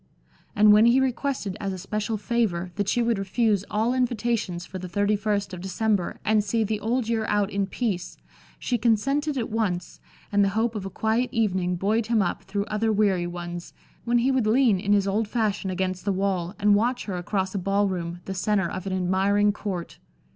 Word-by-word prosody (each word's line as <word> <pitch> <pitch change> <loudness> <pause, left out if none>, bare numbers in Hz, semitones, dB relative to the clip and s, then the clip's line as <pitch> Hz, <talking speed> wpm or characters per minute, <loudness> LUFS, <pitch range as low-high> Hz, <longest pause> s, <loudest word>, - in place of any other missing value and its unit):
And 210 0 +7
when 215 +2 +6
he 245 +3 +5
requested 260 -6 -1
as 195 -1 -2
a 190 - -4
special 210 +4 -3
favor, 200 -6 -1
that 200 -1 -1
she 240 - +2
would 230 -3 +1
refuse 200 0 +1
all 220 +4 +1
invitations 235 -7 -1
for 185 - -7
the 180 0 -7
thirty 205 +4 +1
first 205 -2 -1
of 180 - -6
December 195 0 -1
and 215 -1 +3
see 220 +2 0
the 215 0 -2
Old 230 +3 -1
Year 225 -1 0
out 205 0 +1
in 200 -1 0
peace, 195 -5 -3 0.4
she 245 -2 -1
consented 275 +7 +1
at 230 -4 -2
once, 190 -6 -2 0.3
and 205 0 +4
the 195 - +3
hope 230 +1 +1
of 200 -3 -4
a - - -6
quiet 220 +5 0
evening 185 -5 0
buoyed 215 +5 0
him 225 -3 +3
up 175 - -2
through 200 +1 -2
other 220 0 0
weary 200 -4 +2
ones, 175 0 -7 0.3
when 240 0 +2
he 250 +3 +2
would 255 -5 +1
lean 225 -3 +4
in 200 +2 +1
his 200 -1 +2
old 210 +2 0
fashion 210 -4 -1
against 185 0 -2
the 200 - 0
wall, 190 -1 -1
and 210 -1 +4
watch 240 +4 +1
her 195 - -4
across 190 +1 -2
a 200 - -1
ball 200 +2 +1
room, 175 -2 -4
the 190 - -4
center 195 0 +1
of 185 +2 -6
an 190 - -2
admiring 190 +3 +2
court. 190 -5 -5
205 Hz, 205 wpm, -25 LUFS, 190-225 Hz, 0.4 s, And